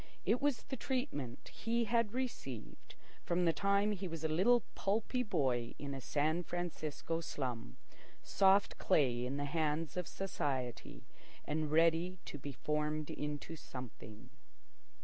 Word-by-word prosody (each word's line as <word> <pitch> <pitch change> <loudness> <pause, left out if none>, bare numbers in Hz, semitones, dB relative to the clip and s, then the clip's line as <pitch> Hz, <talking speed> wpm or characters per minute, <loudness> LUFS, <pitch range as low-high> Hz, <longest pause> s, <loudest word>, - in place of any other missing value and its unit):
It 220 +6 +3
was 285 -3 +1
the 265 - -4
treatment 235 - -3
he 235 +1 0
had 230 -1 +2
received 230 - -5 0.3
from 175 +1 +2
the 165 - +4
time 200 +5 +3
he 195 -2 -2
was 165 -2 -5
a - - +3
little 200 +10 +5
pulpy 220 +5 0
boy 130 - 0
in 140 -1 -4
a 135 - -5
San 155 +6 +1
Francisco 165 -2 -3
slum—soft 145 - 0
clay 130 -9 +3
in 135 +2 -2
the 145 - -1
hands 155 0 0
of 180 - -1
society 135 -10 -3 0.4
and 155 0 0
ready 165 +3 +4
to 150 - -6
be 140 +1 -5
formed 150 +2 -1
into 150 +2 -4
something. 125 -4 -9
160 Hz, 135 wpm, -36 LUFS, 140-195 Hz, 0.4 s, little